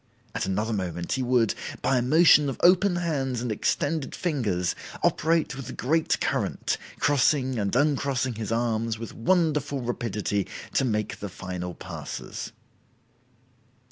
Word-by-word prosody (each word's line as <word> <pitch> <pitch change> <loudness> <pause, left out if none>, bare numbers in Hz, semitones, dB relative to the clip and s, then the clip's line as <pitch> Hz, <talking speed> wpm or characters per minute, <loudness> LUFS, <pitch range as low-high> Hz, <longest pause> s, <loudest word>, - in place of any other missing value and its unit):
At - - -2
another 105 +4 -1
moment 85 -4 -3
he 130 - 0
would, 120 -3 +2 0.3
by 130 -2 +3
a - - +1
motion 150 +2 +6
of 135 - -5
open 180 +1 +5
hands 140 -8 -1
and 120 -1 -2
extended 145 +7 -1
fingers, 105 - 0 0.3
operate 160 -2 +2
with 135 -3 -7
the 130 - -6
great 160 +5 +1
current, - - -1 0.2
crossing 130 -3 +2
and 100 +1 -1
uncrossing 140 -2 +1
his 110 -1 -5
arms 115 -1 0
with 115 0 -7
wonderful 150 -2 +1
rapidity 105 -4 -2 0.3
to - - +2
make 105 -3 -1
the 100 - -5
final 90 -1 -6
passes." - - -7
125 Hz, 140 wpm, -26 LUFS, 110-145 Hz, 0.3 s, motion